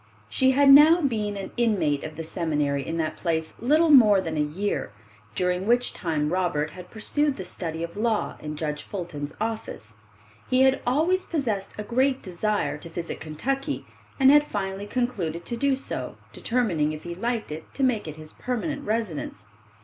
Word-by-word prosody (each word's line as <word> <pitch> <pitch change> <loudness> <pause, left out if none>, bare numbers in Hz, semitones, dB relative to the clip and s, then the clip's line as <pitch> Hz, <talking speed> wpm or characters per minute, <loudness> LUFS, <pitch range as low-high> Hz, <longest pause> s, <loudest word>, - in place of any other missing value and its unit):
She 260 - +3
had 275 +1 +6
now 305 +5 +9
been 215 -9 -1
an 195 -1 -6
inmate 180 -12 +1
of 155 0 -6
the 165 - -5
seminary 150 -4 -1
in 165 +4 -4
that 155 -1 -2
place 160 -2 -1
little 310 +6 +4
more 215 -8 +7
than 165 -4 -3
a - - -1
year, 160 - -2 0.4
during 180 +3 0
which 245 +1 +2
time 155 -2 -1
Robert 160 -5 0
had 180 +2 -11
pursued 290 +6 0
the 190 - -5
study 165 -2 -4
of 170 - -6
law 220 0 0
in 150 0 -6
Judge 150 -1 -3
Fulton's 155 -6 -6
office. 215 - -5 0.5
He 255 0 +4
had 265 0 +3
always 330 +9 +2
possessed 230 - -2
a 210 - -3
great 260 +4 +1
desire 190 -2 -1
to 165 - -6
visit 165 0 -5
Kentucky, 275 - -3 0.3
and 265 0 +7
had 295 0 +5
finally 195 0 -3
concluded 200 -9 -2
to 235 - -3
do 275 +3 +2
so, 270 - -5 0.2
determining 180 -11 0
if 155 - -8
he 175 - -5
liked 230 +1 -2
it 155 +1 -8
to 275 - -1
make 240 -8 +1
it 155 0 -7
his 155 0 -11
permanent 280 +4 -3
residence. 215 - -3
200 Hz, 180 wpm, -25 LUFS, 160-255 Hz, 0.5 s, now